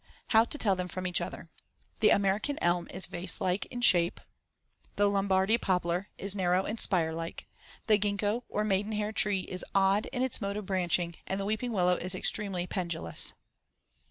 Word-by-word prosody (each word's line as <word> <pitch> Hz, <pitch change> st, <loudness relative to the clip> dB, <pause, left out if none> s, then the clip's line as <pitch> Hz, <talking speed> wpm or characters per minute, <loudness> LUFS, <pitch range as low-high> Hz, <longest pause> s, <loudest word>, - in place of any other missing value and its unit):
How 225 Hz, -1 st, +5 dB
to 295 Hz, -, 0 dB
tell 200 Hz, -8 st, +2 dB
them 180 Hz, 0 st, -3 dB
from 185 Hz, 0 st, -6 dB
each 180 Hz, -1 st, +1 dB
other: -, -, -6 dB, 0.5 s
The -, -, +5 dB
American 200 Hz, +8 st, +1 dB
elm 175 Hz, 0 st, +1 dB
is -, -, -3 dB
vase 175 Hz, +2 st, -3 dB
like 185 Hz, +1 st, -1 dB
in 245 Hz, -1 st, -6 dB
shape; 175 Hz, -7 st, +5 dB, 0.8 s
the 205 Hz, -, +3 dB
Lombardy 195 Hz, +2 st, +2 dB
poplar 180 Hz, 0 st, 0 dB
is 200 Hz, 0 st, -2 dB
narrow 185 Hz, -1 st, +2 dB
and 220 Hz, +1 st, -4 dB
spire 165 Hz, -4 st, +2 dB
like; 165 Hz, +1 st, -6 dB, 0.4 s
the 215 Hz, -2 st, +4 dB
gingko, 205 Hz, +3 st, 0 dB
or 210 Hz, -, -1 dB
maidenhair 210 Hz, +1 st, -1 dB
tree, 205 Hz, -3 st, +1 dB
is 185 Hz, 0 st, -6 dB
odd 195 Hz, +2 st, +3 dB
in 255 Hz, -1 st, -2 dB
its 260 Hz, -3 st, 0 dB
mode 200 Hz, 0 st, -2 dB
of 210 Hz, -, -5 dB
branching; 175 Hz, -2 st, 0 dB
and 190 Hz, -, -2 dB
the 195 Hz, -, -2 dB
weeping 220 Hz, +4 st, -2 dB
willow 180 Hz, -4 st, +2 dB
is 185 Hz, +1 st, -2 dB
extremely 190 Hz, -2 st, -2 dB
pendulous. 170 Hz, -3 st, 0 dB
195 Hz, 180 wpm, -30 LUFS, 180-210 Hz, 0.8 s, How